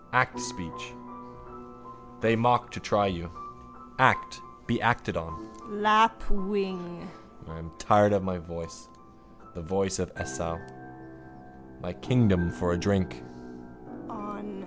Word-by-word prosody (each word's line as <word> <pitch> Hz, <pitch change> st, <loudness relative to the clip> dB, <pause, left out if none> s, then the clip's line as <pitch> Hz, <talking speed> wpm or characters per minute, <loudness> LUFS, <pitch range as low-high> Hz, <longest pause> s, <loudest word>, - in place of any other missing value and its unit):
Act 125 Hz, -1 st, +3 dB
speech. 80 Hz, -, -7 dB, 1.3 s
They 115 Hz, +1 st, +4 dB
mock 120 Hz, +1 st, +3 dB
to -, -, -7 dB
try 100 Hz, -1 st, +2 dB
you. 85 Hz, -2 st, -4 dB, 0.7 s
Act. 115 Hz, -, +4 dB, 0.3 s
Be 120 Hz, 0 st, 0 dB
acted 115 Hz, -2 st, +1 dB
on. 80 Hz, +6 st, -7 dB, 0.2 s
Lapwing. 205 Hz, -4 st, +1 dB, 0.4 s
I 80 Hz, +1 st, -10 dB
am 80 Hz, 0 st, -10 dB
tired 105 Hz, -1 st, +5 dB
of 100 Hz, -1 st, +2 dB
my 95 Hz, -1 st, -2 dB
voice, 85 Hz, -1 st, -9 dB, 0.7 s
the 85 Hz, -, -7 dB
voice 95 Hz, +3 st, -1 dB
of 90 Hz, -3 st, -3 dB
Esau. 80 Hz, +6 st, -4 dB, 1.2 s
My 90 Hz, -, -5 dB
kingdom 95 Hz, -8 st, +3 dB
for 90 Hz, 0 st, -1 dB
a -, -, 0 dB
drink. 90 Hz, -11 st, 0 dB
100 Hz, 110 wpm, -28 LUFS, 85-125 Hz, 1.3 s, tired